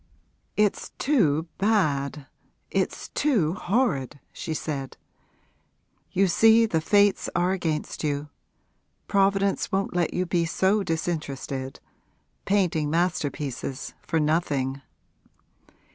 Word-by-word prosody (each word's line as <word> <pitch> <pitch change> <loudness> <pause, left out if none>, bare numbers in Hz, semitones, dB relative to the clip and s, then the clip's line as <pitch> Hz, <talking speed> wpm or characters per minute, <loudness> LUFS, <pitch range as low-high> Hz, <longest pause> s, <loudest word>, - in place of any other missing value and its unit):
'It's 210 -1 +1
too 170 - +2
bad, 150 -9 +1 0.5
it's - - -1
too 215 - +1
horrid!' 190 - 0
she 160 - -6
said. 145 -3 -4 1.1
'You 195 - +3
see 225 +5 +5
the 165 -7 0
fates 205 +3 +3
are 175 +1 +2
against 165 -6 -2
you. 145 0 -2 0.8
Providence 195 0 +2
won't 195 -1 -1
let 175 -1 +1
you 180 - -1
be 175 -1 +1
so 190 +5 +2
disinterested 150 -6 -3 0.7
painting 175 -7 +1
masterpieces 145 -5 -2
for 160 - -1
nothing.' 145 -4 0
170 Hz, 100 wpm, -26 LUFS, 150-195 Hz, 1.1 s, see